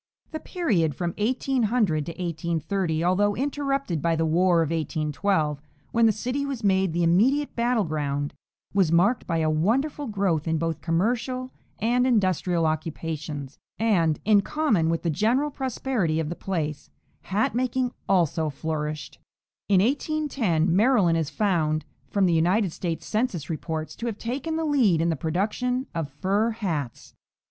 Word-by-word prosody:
The 315 - -4
period 195 - 0
from 170 +2 -2
1800 225 - +1 0.6
30, 170 -5 0
although 200 +3 +2
interrupted 275 - -1
by 165 +1 +1
the 160 0 +1
war 170 +1 +3
of 160 - -3
1812, 155 0 -1 0.3
when 230 0 +4
the - - +5
city 250 +6 -2
was 275 -5 -4
made 190 -2 +2
the 170 +1 0
immediate 245 - +3
battle 235 -1 +2
ground, 145 -3 -2 0.4
was 190 -5 +3
marked 195 +8 +3
by 165 - 0
a 160 -1 +1
wonderful 265 - 0
growth 195 -7 0
in 160 0 +1
both 165 0 -2
commercial 245 +9 -1 0.3
and 245 +3 +2
industrial 185 -7 +2
occupations, 155 -3 -4 0.2
and, 175 -9 +2
in 210 -1 +5
common 215 - +1
with 165 0 -1
the 170 - +1
general 235 - +1
prosperity 245 - -1
of 155 -2 -2
the 170 - -4
place, 155 -7 -3 0.4
hat 205 +3 0
making 250 +1 0 0.2
also 165 -4 +2
flourished. 150 +1 -4 0.5
In 190 -2 +5
1810 250 - 0
Maryland 200 -7 +4
is 155 -3 -2
found, 155 -7 0 0.2
from 200 -2 +2
the 175 - +3
United 180 +4 +2
States 170 -3 -4
census 210 - -1
reports, 155 0 -4
to 235 - -4
have 220 -3 -3
taken 265 +8 -3
the 320 0 -1
lead 245 - +3
in 165 +1 +1
the 165 - +1
production 215 - -1
of 165 -4 -3
fur 195 +10 0
hats. 165 - -4
185 Hz, 150 wpm, -25 LUFS, 160-235 Hz, 0.6 s, the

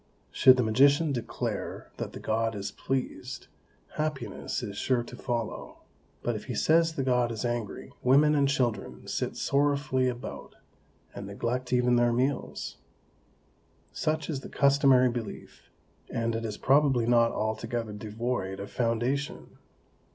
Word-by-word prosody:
Should 130 -1 +7
the 125 - +3
magician 140 +7 +4
declare 120 -3 -4
that - - -5
the - - -7
God 115 0 0
is 100 0 -4
pleased, 135 -1 -4 0.5
happiness 135 -7 -3
is 100 -4 -5
sure 120 +3 +1
to 120 - -10
follow; 120 -2 -4 0.4
but 120 - 0
if 105 - -6
he 125 - -4
says 165 +5 +3
the 135 - -1
God 125 -2 +2
is 110 0 -3
angry, 120 -3 -3
women 145 +4 +5
and 140 -2 +3
children 120 -7 -1
sit - - -2
sorrowfully 140 -2 +1
about, 120 0 -7 0.6
and 100 -1 -7
neglect 120 +5 -3
even 125 -1 +3
their 120 0 +4
meals. 130 +3 -2 1.1
Such 155 -1 -1
is 150 -5 -2
the - - -10
customary 135 -3 +4
belief, 115 -3 -7 0.4
and 115 0 -1
it 115 0 -3
is 105 -2 -4
probably 135 -3 +3
not 115 -1 +4
altogether 110 0 -2
devoid 105 -2 -3
of 100 - -7
foundation. 120 +4 -2
125 Hz, 140 wpm, -28 LUFS, 115-135 Hz, 1.1 s, Should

